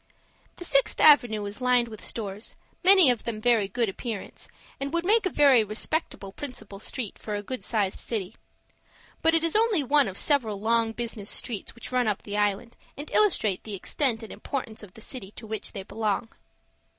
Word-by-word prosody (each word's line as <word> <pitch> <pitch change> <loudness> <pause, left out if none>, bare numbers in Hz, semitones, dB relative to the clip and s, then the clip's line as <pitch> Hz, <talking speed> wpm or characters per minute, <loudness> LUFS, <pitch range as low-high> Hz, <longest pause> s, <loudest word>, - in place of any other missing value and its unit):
The 355 - -9
Sixth 275 -4 +2
Avenue 240 -8 +6
is 205 +5 -7
lined 250 -1 +3
with 215 -2 -10
stores, 210 -1 -5 0.3
many 370 -7 +8
of 240 - -2
them 235 -1 -4
of 215 - -11
very 230 -5 +3
good 230 +4 -1
appearance, 210 +1 -6 0.3
and 275 0 -3
would 340 +1 -1
make 430 +1 +4
a - - -1
very 275 -8 +5
respectable 215 -1 -3
principal 220 -5 -7
street 225 0 -4
for 210 - -4
a 205 - -4
good 255 +4 -5
sized 205 -4 -1
city. 215 -3 -4 0.9
But 325 0 +4
it 330 - +2
is 330 +2 0
only 435 -7 +3
one 285 0 +3
of 190 0 -6
several 230 -9 +1
long 225 +1 +2
business 225 -3 -5
streets 230 -3 -3
which 235 - -9
run 250 -2 +1
up 210 -2 -1
the 205 - -5
island, 210 +3 -1 0.2
and 290 +2 -8
illustrate 220 - +2
the 210 -2 -5
extent 230 +4 -1
and 220 - -8
importance 240 -5 -5
of 205 -4 -13
the 225 - -12
city 215 -4 -6
to 225 - -10
which 220 -1 -4
they 195 - -5
belong. 220 +2 -2
230 Hz, 195 wpm, -26 LUFS, 210-275 Hz, 0.9 s, many